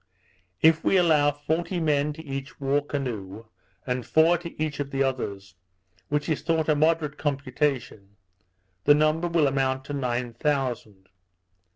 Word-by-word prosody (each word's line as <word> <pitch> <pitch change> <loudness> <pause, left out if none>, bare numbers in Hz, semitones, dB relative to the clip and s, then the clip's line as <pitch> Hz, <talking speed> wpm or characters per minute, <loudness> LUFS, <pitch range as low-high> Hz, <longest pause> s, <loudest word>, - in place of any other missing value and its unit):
If 160 0 +5
we 195 - +3
allow 155 -5 +4
forty 160 +5 -2
men 150 -2 +1
to 160 +2 -11
each 135 -1 -6
war 140 +1 +1
canoe, 115 -8 -5 0.4
and 125 -1 -2
four 160 +8 +4
to 170 -2 -10
each 150 -2 -2
of 140 -1 -3
the 135 -1 0
others, 100 -8 -3 0.6
which 150 0 -1
is 155 - -1
thought 160 -1 0
a 155 - +4
moderate 155 -1 +1
computation, 135 -7 -2 0.7
the 145 - +7
number 155 +3 +2
will 165 -3 +2
amount 135 -1 0
to 145 - -6
nine 125 -3 -2
thousand. 120 -8 -2
145 Hz, 150 wpm, -26 LUFS, 130-155 Hz, 0.7 s, the